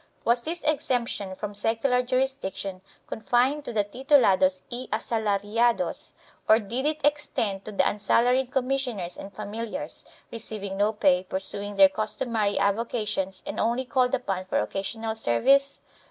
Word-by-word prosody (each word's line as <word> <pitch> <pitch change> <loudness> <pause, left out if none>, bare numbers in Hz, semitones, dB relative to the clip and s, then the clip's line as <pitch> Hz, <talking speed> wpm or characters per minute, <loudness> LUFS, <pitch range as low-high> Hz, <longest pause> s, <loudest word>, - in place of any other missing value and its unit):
Was 240 +1 +3
this 335 +6 -5
exemption 240 -9 -1
from 210 +1 -5
secular 230 +5 +1
jurisdiction 245 -8 -2 0.2
confined 250 +6 +1
to - - -4
the 215 -3 +1
tilulados 200 -6 +3
y 245 +2 -5
asalariados 220 +3 0 0.4
or 220 - +8
did 235 +6 -2
it 305 0 -1
extend 275 -10 0
to 215 - -6
the 200 - +2
unsalaried 245 +5 +2
commissioners 250 -9 -1
and 195 - -9
familiars, 215 +3 -6 0.3
receiving 210 -4 -5
no 205 +2 +2
pay, 190 -4 +3
pursuing 200 +2 -1
their 195 -1 +8
customary 215 +1 -1
avoca 215 +3 0
tions 190 -1 -3
and - - -5
only 240 +3 0
called 250 0 +2
upon 195 -7 -3
for - - 0
occasional 220 - -3
service? 270 - +2
220 Hz, 140 wpm, -26 LUFS, 200-250 Hz, 0.4 s, or